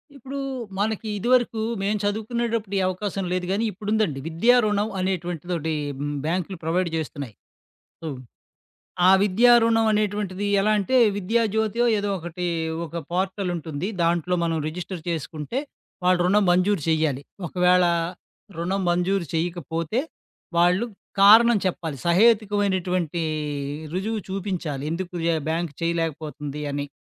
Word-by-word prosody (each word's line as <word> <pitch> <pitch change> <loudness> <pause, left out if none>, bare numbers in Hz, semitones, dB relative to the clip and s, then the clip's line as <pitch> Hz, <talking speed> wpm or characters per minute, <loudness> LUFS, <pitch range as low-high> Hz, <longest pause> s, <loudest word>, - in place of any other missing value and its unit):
ఇప్పుడూ 275 +1 -7 0.4
మనకి 220 +2 -1
ఇదివరకు, 240 +1 +2 0.2
మేము 205 +2 0
చదువుకునేటప్పుడీ 220 0 -1
అవకాశం 195 +1 -3
లేదు 180 0 -1
గానీ, 210 +4 +1
ఇప్పుడుందండి. 210 -6 -1
విద్యా 170 +10 +4
రుణం 210 0 +1
అనేటువంటిదోటి. 175 -3 -2 0.3
హ్మ్, 145 +1 -3
బ్యాంకులు 180 +3 -2
ప్రొవైడ్ 170 +2 0
జేస్తున్నాయి. 145 -6 -4 0.7
సో, 165 - -5 1.0
ఆ - - +8
విద్యారుణం 225 +2 +5
అనేటువంటిది 205 -2 -1
ఎలా 210 +2 +2
అంటే, 205 +6 +1 0.2
విద్యాజ్యోతో 220 +2 +1
ఏదో 205 0 -2
ఒకటి 175 +1 -5 0.4
ఒక 170 +2 -5
పోర్టలుంటుంది. 180 -3 -2
దాంట్లో 170 +1 +1
మనం 165 -1 0
రిజిస్టర్ 180 +1 -6
చేసుకుంటే, 160 - -4 0.5
వాళ్ళు 180 0 +4
రుణం 205 +3 +4
మంజూరు 185 0 +2
చేయాలి. 155 -4 +1 0.3
ఒకవేళ, 180 +1 +4 0.7
రుణం 190 +4 -1
మంజూరు 180 +1 +1
చేయకపోతే, 165 - -1 0.6
వాళ్ళు 180 +5 +4 0.4
కారణం 225 +4 +8
చెప్పాలి. 165 -5 -2
సహేతుకమైనటువంటీ 190 -4 +2 0.7
రుజువు 210 +5 -2
చూపించాలి. 185 -7 -3
ఎందుకు 180 +2 -4 0.3
బ్యాంక్ 165 -1 -1
చేయలేకపోతుంది 155 -3 -3
అని. 145 0 -2
185 Hz, 110 wpm, -24 LUFS, 165-210 Hz, 1.0 s, ఆ